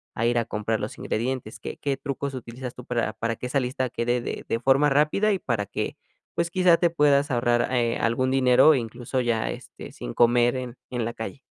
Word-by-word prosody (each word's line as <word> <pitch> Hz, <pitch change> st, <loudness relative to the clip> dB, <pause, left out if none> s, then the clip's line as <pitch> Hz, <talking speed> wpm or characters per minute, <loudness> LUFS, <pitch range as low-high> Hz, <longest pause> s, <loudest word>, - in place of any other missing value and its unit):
a 115 Hz, -, 0 dB
ir 120 Hz, 0 st, +1 dB
a 115 Hz, -, -1 dB
comprar 110 Hz, 0 st, -2 dB
los 105 Hz, -, -5 dB
ingredientes, 120 Hz, 0 st, -3 dB
¿qué -, -, -7 dB
qué 140 Hz, -2 st, -2 dB
trucos 140 Hz, 0 st, -4 dB
utilizas 125 Hz, 0 st, -7 dB
tú 125 Hz, -, -9 dB
para 120 Hz, -3 st, -1 dB
para 115 Hz, 0 st, -2 dB
que -, -, -6 dB
esa 135 Hz, +2 st, +1 dB
lista 130 Hz, 0 st, -2 dB
quede 120 Hz, 0 st, 0 dB
de -, -, -5 dB
de 115 Hz, -, -1 dB
forma 135 Hz, +4 st, +4 dB
rápida 150 Hz, +9 st, +3 dB
y -, -, +1 dB
para 115 Hz, -9 st, -1 dB
que, -, -, -4 dB, 0.4 s
pues, 170 Hz, 0 st, 0 dB
quizá 180 Hz, -2 st, +5 dB
te 175 Hz, -, +3 dB
puedas 145 Hz, -2 st, +3 dB
ahorrar, 120 Hz, -1 st, +2 dB
eh, 120 Hz, -2 st, +1 dB
algún 130 Hz, +3 st, +1 dB
dinero, 130 Hz, +3 st, +6 dB
incluso 125 Hz, +1 st, -3 dB
ya, 115 Hz, -2 st, 0 dB
este, -, -, -10 dB
sin -, -, -7 dB
comer 120 Hz, +1 st, +4 dB
en 125 Hz, -1 st, -6 dB
en 120 Hz, -2 st, -1 dB
la 115 Hz, -, -3 dB
calle? 115 Hz, +4 st, -7 dB
125 Hz, 215 wpm, -25 LUFS, 115-135 Hz, 0.4 s, dinero